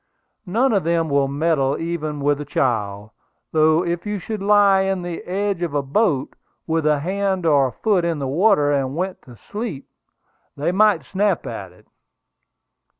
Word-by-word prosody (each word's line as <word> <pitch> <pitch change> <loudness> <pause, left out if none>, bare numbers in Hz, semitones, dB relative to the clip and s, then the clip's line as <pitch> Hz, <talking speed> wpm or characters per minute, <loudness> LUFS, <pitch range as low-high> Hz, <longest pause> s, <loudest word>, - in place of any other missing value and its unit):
None 235 +7 +2
of 200 - +2
them 165 -1 0
will 140 -1 +2
meddle 140 -1 0
even 155 -3 -4
with 145 +1 +1
a - - -3
child; 105 -7 -2 0.4
though 160 +2 +3
if 170 0 -2
you 210 -1 -3
should 210 +2 -5
lie 200 -1 +4
on 190 -2 -2
the 175 -1 -5
edge 195 0 -2
of 165 -4 -2
a 145 - +1
boat, 145 -1 0 0.3
with 160 -1 0
a 150 -2 +2
hand 190 +1 -1
or 140 -5 +3
foot 195 - +1
in 170 -2 -1
the 140 - -3
water, 150 +1 +3
and 135 -1 -1
went 185 +2 -3
to 125 - -14
sleep, 205 - -6 0.7
they 145 +4 0
might 195 -6 +3
snap 195 +2 0
at 100 -5 -6
it." 90 - -22
165 Hz, 170 wpm, -21 LUFS, 140-195 Hz, 0.7 s, lie